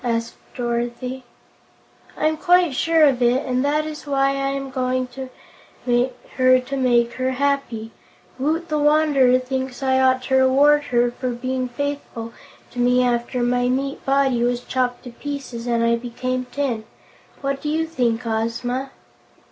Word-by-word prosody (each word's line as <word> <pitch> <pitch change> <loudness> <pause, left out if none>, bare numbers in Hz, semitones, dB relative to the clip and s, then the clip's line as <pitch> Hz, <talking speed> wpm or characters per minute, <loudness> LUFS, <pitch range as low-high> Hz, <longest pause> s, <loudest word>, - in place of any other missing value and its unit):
asked 230 -1 -1 0.2
Dorothy. 240 +1 -3 0.9
"I'm 310 0 +1
quite 355 -1 +3
sure 325 +4 +3
of 270 -4 +4
it, 245 +3 +2
and 255 0 0
that 300 +2 +1
is 305 -1 -7
why 275 -1 +2
I 275 0 -1
am 275 -1 -4
going 255 0 0
to 260 +1 -7 0.6
her 255 +1 +2
to 255 +2 -5
make 240 -3 +2
her 260 0 -1
happy. 270 -5 -1 0.5
Woot 320 +5 0
the 305 -1 0
Wanderer 295 -4 +4
thinks 260 +1 -4
I 260 0 +3
ought 260 -1 +3
to 265 0 +2
reward 285 +3 +4
her 240 -3 +2
for 255 +1 -4
being 255 +1 -3
faithful 245 -3 -5 0.4
to 245 - -7
me 250 +1 +3
after 240 0 0
my 245 0 +1
meat 275 +2 -2
body 270 -3 +2
was 240 0 +1
chopped 250 -1 -2
to 245 - -9
pieces 255 -3 -6
and 235 -1 +1
I 235 0 +3
became 255 +2 -3
tin. 250 -4 -2 0.6
What 275 0 -2
do 300 - -3
you 320 +1 0
think, 245 -7 -1
Ozma?" 230 +4 -2
255 Hz, 155 wpm, -22 LUFS, 245-275 Hz, 0.9 s, of